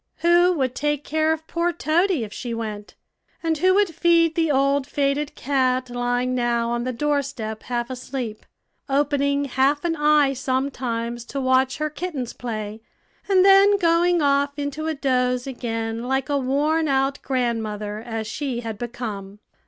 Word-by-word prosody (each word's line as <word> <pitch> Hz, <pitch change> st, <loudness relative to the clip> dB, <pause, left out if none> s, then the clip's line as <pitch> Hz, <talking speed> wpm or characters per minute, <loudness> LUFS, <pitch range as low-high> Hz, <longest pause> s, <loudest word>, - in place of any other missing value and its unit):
Who 345 Hz, +1 st, +5 dB
would 260 Hz, -6 st, -1 dB
take 295 Hz, +1 st, -1 dB
care 315 Hz, +1 st, +1 dB
of 320 Hz, 0 st, -3 dB
poor 340 Hz, +2 st, 0 dB
Toady 345 Hz, -, +1 dB
if 210 Hz, -, -7 dB
she 235 Hz, -2 st, -4 dB
went? 215 Hz, -2 st, -6 dB, 0.5 s
and 320 Hz, -2 st, 0 dB
who 370 Hz, +2 st, +4 dB
would 400 Hz, -4 st, +2 dB
feed 335 Hz, 0 st, +3 dB
the 325 Hz, -1 st, +1 dB
old 275 Hz, 0 st, +2 dB
faded 285 Hz, 0 st, -1 dB
cat 255 Hz, -2 st, 0 dB
lying 245 Hz, +1 st, -1 dB
now 235 Hz, -1 st, 0 dB
on 240 Hz, 0 st, -1 dB
the 255 Hz, -, -1 dB
doorstep 270 Hz, -5 st, -2 dB
half 240 Hz, 0 st, -3 dB
asleep, 250 Hz, -3 st, -5 dB, 0.5 s
opening 280 Hz, 0 st, +1 dB
half 275 Hz, +3 st, +1 dB
an 330 Hz, -1 st, +1 dB
eye 295 Hz, -2 st, +3 dB
sometimes 250 Hz, -3 st, -2 dB
to 275 Hz, -, -5 dB
watch 260 Hz, 0 st, +2 dB
her 305 Hz, 0 st, -2 dB
kittens 295 Hz, -6 st, -4 dB
play, 215 Hz, -2 st, -5 dB, 0.5 s
and 380 Hz, -1 st, +5 dB
then 395 Hz, +1 st, +7 dB
going 340 Hz, -1 st, +3 dB
off 280 Hz, 0 st, +2 dB
into 290 Hz, +2 st, -3 dB
a 320 Hz, -, -1 dB
doze 250 Hz, -3 st, 0 dB
again 230 Hz, -3 st, -3 dB
like 265 Hz, +2 st, -1 dB
a 285 Hz, -, +2 dB
worn 295 Hz, +5 st, +1 dB
out 270 Hz, 0 st, 0 dB
grandmother, 220 Hz, -5 st, -2 dB
as 225 Hz, -1 st, -5 dB
she 245 Hz, +2 st, -3 dB
had 225 Hz, -3 st, -6 dB
become. 215 Hz, -5 st, -6 dB
270 Hz, 160 wpm, -23 LUFS, 240-300 Hz, 0.5 s, then